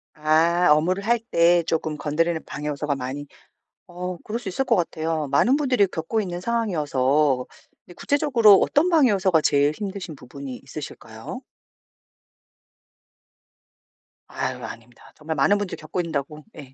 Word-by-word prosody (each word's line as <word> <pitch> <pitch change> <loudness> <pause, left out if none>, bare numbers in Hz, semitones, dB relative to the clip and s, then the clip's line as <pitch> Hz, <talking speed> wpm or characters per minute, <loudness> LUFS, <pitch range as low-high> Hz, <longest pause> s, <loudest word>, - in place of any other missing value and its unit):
아, 160 +3 +3
업무를 180 +6 +2
할 235 +1 +3
때 175 -6 +3
쪼끔 160 -1 -2
건드리는 160 +3 0
방해 150 +1 -6
요소가 145 0 -2
많이 135 +2 -5 0.6
어 180 0 -6
그럴 220 +6 -5
수 230 -4 -7
있을 190 +9 -1
것 240 -4 +2
같아요. 160 -3 -2
많은 245 - +3
분들이 255 -8 +2
겪고 175 +6 -2
있는 180 -3 -4
상황이어서 150 - +1 0.4
근데 175 - -14
구체적으로 260 -8 +4
어떤 330 +6 +2
방해 300 -7 +5
요소가 190 -5 +2
제일 145 0 +2
힘드신 190 -2 -6
부분이 135 0 -9
있으실까요? - - -8 2.9
아유 - - -4
아닙니다. 115 +1 -11
정말 160 +1 -5
많은 175 +9 +3
분들이 205 -2 -4
겪고 - - -5
있는다고 150 -2 -5
예. 135 -3 -11
170 Hz, 325 characters per minute, -23 LUFS, 150-205 Hz, 2.9 s, 방해